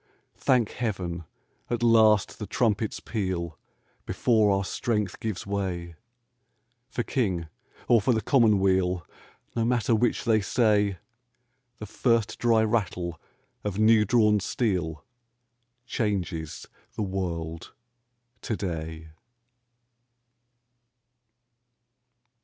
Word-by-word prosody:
Thank 125 -5 +2
Heaven! 90 -8 -3 0.4
At 120 -1 -1
last 110 -4 +4
the - - -5
trumpets 110 -2 0
peal 90 -7 -3 0.5
Before 110 -4 +3
our 100 0 +1
strength 105 -4 -2
gives 110 -4 -4
way. 95 -4 -3 1.0
For 120 - -2
King 95 - -1 0.4
or 115 -2 +5
for 115 - +2
the 110 - +2
Commonweal 95 - +3 0.5
No 115 - +1
matter 120 -1 +1
which 115 +1 +1
they 110 -2 +3
say, 105 -2 +2 0.8
The 105 - -7
first 115 +1 0
dry 115 -2 +3
rattle 90 -7 -1 0.4
of 100 -2 -3
new 110 0 +5
drawn 105 -1 +3
steel 90 - -2 0.8
Changes 90 -9 -3 0.3
the 110 - -2
world 85 -4 -4 0.7
to 110 -5 -3
day 80 -3 -5
105 Hz, 95 wpm, -27 LUFS, 90-115 Hz, 1.0 s, or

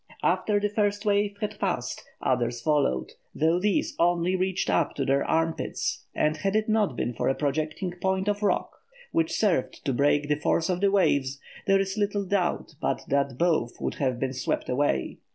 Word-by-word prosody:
After 210 -1 +2
the 205 - +1
first 205 0 0
wave 205 0 +1
had 210 - -3
passed, - - -2 0.2
others 120 0 0
followed, 120 - +1 0.2
though 165 +3 +2
these 205 +1 0
only 175 +1 +2
reached 185 0 0
up - - +1
to 135 - -1
their 135 +1 +2
arm 165 0 +1
pits, - - -3
and 155 +1 +1
had 195 +5 -1
it 215 0 +2
not 215 - +2
been 120 - -2
for - - 0
a 135 - +1
projecting 155 +5 -2
point 190 +1 0
of 205 0 0
rock, 205 - 0 0.3
which 330 -1 +1
served 195 - 0
to 135 - +1
break 145 +2 +2
the 150 0 +1
force 165 +3 +1
of 180 0 -2
the 200 - +4
waves, 140 -9 +2 0.3
there 195 0 +5
is 195 +2 -2
little 205 -1 0
doubt 180 -4 -1
but - - -1
that 140 -2 +1
both 160 -8 +1
would - - -2
have 130 -3 0
been 130 0 -1
swept 130 - -2
away. 125 - 0
175 Hz, 190 wpm, -27 LUFS, 140-200 Hz, 0.3 s, there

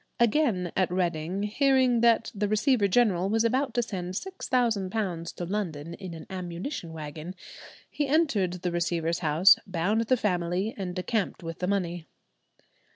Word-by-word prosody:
Again 230 - +2
at 185 - +2
Reading, 175 +1 -1
hearing 255 +2 +3
that 230 -1 +3
the 205 -1 -1
Receiver 215 +1 +2
General 195 -3 +2
was 225 +2 +2
about 255 +4 0
to 240 - +2
send 185 -4 -5
£6,000 215 - -1
to 175 - -4
London 170 -5 -3
in 185 -4 -8
an 160 - -9
ammunition 180 - -5
wagon, 155 +3 -7 0.5
he 290 - -2
entered 270 - +2
the 180 - 0
receiver's 170 -1 -1
house, 165 +4 +6
bound 190 +5 0
the 255 - +3
family, 180 0 -1
and 180 -3 -5
decamped 195 0 -2
with 165 0 -6
the 180 - -1
money. 175 -4 -2
190 Hz, 150 wpm, -27 LUFS, 175-225 Hz, 0.5 s, house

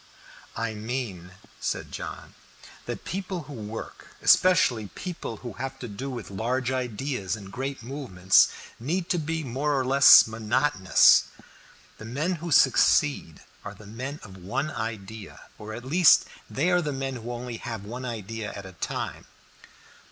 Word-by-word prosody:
"I 115 0 -2
mean," 105 -5 -5 0.3
said - - -3
John, - - -7 0.5
"that - - -5
people 185 -2 -4
who 145 - -10
work, 110 -2 -8 0.2
especially 125 - +4
people 170 - -6
who 120 - -5
have 130 +6 -5
to 125 - -7
do 115 +6 -6
with 120 -6 -7
large 120 +6 -1
ideas 125 -4 -2
and 100 -3 -10
great 135 +1 -4
movements, 110 -9 +3 0.3
need 170 +9 -2
to 175 - +1
be 160 +1 -2
more 140 +2 -1
or 130 - -1
less 135 -1 +8
monotonous. 110 -2 +4 0.7
The 110 - -9
men 145 +10 -2
who 170 - -4
succeed 140 - +3 0.2
are - - -7
the 105 - -14
men 130 +8 -6
of 95 -4 -11
one 100 +12 -3
idea 110 -4 -6 0.2
or 105 0 -8
at 120 - -9
least 170 +4 +6 0.2
they 165 +7 +1
are 180 0 +4
the 150 -3 -2
men 135 -1 -3
who 120 +1 -6
only 120 -1 -5
have 115 -4 -6
one 120 +4 -6
idea 110 -2 -5
at 100 - -8
a 95 - -10
time." 90 - -4
120 Hz, 155 wpm, -26 LUFS, 110-140 Hz, 0.7 s, less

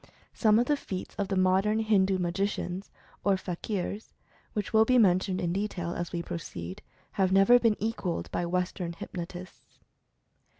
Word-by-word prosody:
Some 215 -2 +4
of 240 - +3
the 295 - +2
feats 185 -8 -6
of 200 - 0
the 195 - -1
modern 190 +3 +3
Hindu 200 -4 +3
magicians, 185 +1 -2 0.3
or 200 -1 +3
fakirs, 195 +3 -4 0.4
which 210 0 -3
will 220 0 +7
be 255 +3 +3
men 185 -6 +5
tioned 185 0 -3
in 170 -1 -1
detail, 185 -3 -2
as 175 -1 -4
we 170 -1 -3
proceed, 90 - -6 0.3
have 190 -2 +1
never 195 +6 +6
been 230 -3 +3
equalled 210 -5 -2
by 175 - -1
Western 180 -1 -2
hypnotists. 175 +1 -8
190 Hz, 160 wpm, -29 LUFS, 175-210 Hz, 0.4 s, will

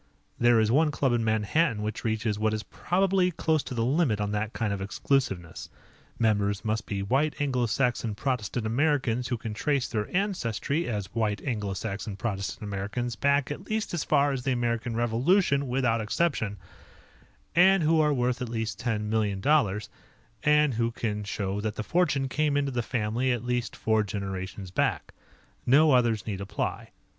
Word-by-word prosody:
There 120 -1 +5
is 110 0 +2
one 155 +5 +4
club 135 -3 +1
in 120 -1 +1
Manhattan 110 +3 +1
which 110 +1 -4
reaches 110 -1 -1
what 110 0 +1
is 110 - -4
probably 185 0 +1
close 160 -2 0
to 130 - -7
the 115 -1 0
limit 135 -5 +2
on 105 0 -1
that 105 +1 -2
kind 110 -4 -1
of 100 - -4
exclusiveness: 95 -4 -1 0.5
Members 105 -2 +1
must 110 0 -1
be 100 -1 -2
white, 135 +9 0
Anglo 130 -4 +1
Saxon, 120 -2 0
Protestant 120 -2 -2
Americans 125 -1 +1
who 120 - -1
can 110 -1 -5
trace 140 +4 0
their 105 -2 -3
ancestry 170 - -1
as 100 -4 -4
white, 110 -3 0
Anglo 105 -7 -2
Saxon, 100 +1 -4
Protestant 100 -2 -3
Americans 105 +4 -3
back 140 +3 +1
at 185 +6 -6
least 220 -2 -2
as 170 - -1
far 145 -1 +3
as 135 -2 -2
the 135 - -1
American 120 -1 -1
Revolution 140 - +2
without 125 -3 +1
exception, 110 -3 -1 1.0
and 190 +1 +6
who 160 +1 +4
are 150 -1 +3
worth 125 -2 0
at 125 - -3
least 110 -3 -3
ten 110 -3 -1
millions, 105 -3 -1 1.0
and 150 0 +4
who 115 0 +1
can 105 -3 -3
show 100 0 -3
that 110 0 -3
the 110 - -3
fortune 150 -3 +1
came 150 +1 +1
into 140 -1 0
the 120 -1 -1
family 120 +2 -1
at 120 -1 -2
least 125 0 -1
four 110 -1 +1
generations 95 -2 -5
back. - - -1 0.5
No 150 +5 +6
others 120 -4 +2
need 100 -3 -4
apply. 100 +1 -3
115 Hz, 170 wpm, -27 LUFS, 105-140 Hz, 1.0 s, and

